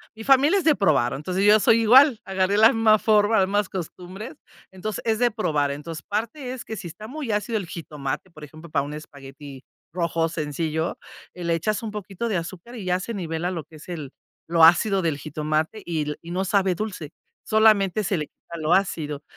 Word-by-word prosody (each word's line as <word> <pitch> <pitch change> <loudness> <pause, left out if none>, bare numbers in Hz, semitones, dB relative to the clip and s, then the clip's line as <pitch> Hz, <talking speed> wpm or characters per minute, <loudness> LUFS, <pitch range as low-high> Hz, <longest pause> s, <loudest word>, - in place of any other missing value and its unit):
mi 225 - -9
familia 275 - +5
es - - -4
de 315 -2 +5
probar, 150 - +2
entonces 180 +7 -1
yo 210 +1 +7
soy 230 +2 +4
igual, 250 +2 +6
agarré 190 +1 0
la 220 +2 +7
misma 220 -1 +4
forma, 215 0 +3
las 190 - +3
mismas 205 0 0
costumbres. 185 - -7 0.4
Entonces, 190 +3 -5
es 220 -1 +1
de 245 -1 +3
probar. 150 -10 0
Entonces, 155 +2 -7
parte 235 +5 -4
es 255 - -8
que 220 - -6
si 195 -4 -7
está 210 +7 -10
muy 270 -2 -5
ácido 210 +2 -1
el 195 -5 -5
jitomate, 150 0 -5
por 155 -2 -13
ejemplo, 155 +3 -12
para 145 -2 0
un 145 +1 -6
espagueti 140 -2 -11 0.3
rojo 170 -2 0
sencillo, 160 +1 -2 0.4
eh, 180 - -8
le 170 - +1
echas 215 +7 -1
un 220 - -4
poquito 205 +1 -5
de 200 - 0
azúcar 180 +7 -7
y 215 -5 -7
ya 180 0 +1
se 230 +5 -5
nivela 175 -2 -3
lo 170 -4 -4
que 160 - -18
es 155 - -13
el 150 -6 -6 0.4
lo 165 -1 +3
ácido 190 +4 +5
del 160 -5 -1
jitomate 155 +6 -2
y 165 -3 -2
l 150 0 -4
y 170 +1 -9
no 185 +2 -1
sabe 190 -1 +2
dulce, 180 -6 -5 0.3
solamente 215 -2 +3
se 190 -1 0
le 150 - -3
quita 170 - -12
lo 155 +3 +2
ácido. 150 -6 0
185 Hz, 210 wpm, -24 LUFS, 155-215 Hz, 0.4 s, yo